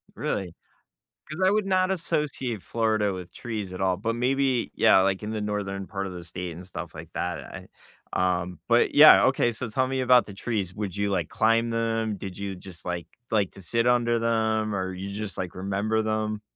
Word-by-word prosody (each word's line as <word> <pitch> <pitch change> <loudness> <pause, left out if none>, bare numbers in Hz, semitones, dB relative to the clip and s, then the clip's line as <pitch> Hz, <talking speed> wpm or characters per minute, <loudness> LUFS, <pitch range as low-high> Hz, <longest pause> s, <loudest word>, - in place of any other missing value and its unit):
Really? 90 -4 -3 0.7
'Cause 155 +5 -5
I 185 - +5
would 210 0 +1
not 185 -1 +2
associate 145 - -2
Florida 110 -2 0
with 90 -2 -8
trees 105 -6 -5
at 90 - -6
all, 95 -1 +2
but 115 +3 -2
maybe, 130 0 +1
yeah, 110 -3 +6
like, 95 +1 0
in 105 - -4
the 110 -1 -3
northern 100 -2 -3
part 100 -2 -4
of 95 - -7
the 90 -1 -7
state 90 +1 -5
and 85 +3 -9
stuff 95 - -7
like - - -9
that, 90 -1 -2
I - - -10 0.5
um, 90 -1 0
but - - +3
yeah, - - +9
okay, 120 - +2
so, 115 +2 -2
tell 130 +4 0
me 130 0 -2
about 125 -1 +5
the 100 - -10
trees, 100 -4 -3
would 100 -2 -4
you, 100 0 0
like, 90 -5 0
climb 115 +1 +2
them? 115 -2 -1
Did 95 -1 -7
you 100 -1 -4
just, 90 -1 -11
like, 90 -1 -3 0.2
like 105 -5 +1
to 100 - -10
sit 115 +6 +1
under 120 -1 +3
them, 110 -2 +1
or 95 -1 -2
you 95 +2 -6
just, 100 0 -5
like, 90 -2 -4
remember 100 +4 -1
them? 110 -1 -2
105 Hz, 205 wpm, -26 LUFS, 95-115 Hz, 0.7 s, yeah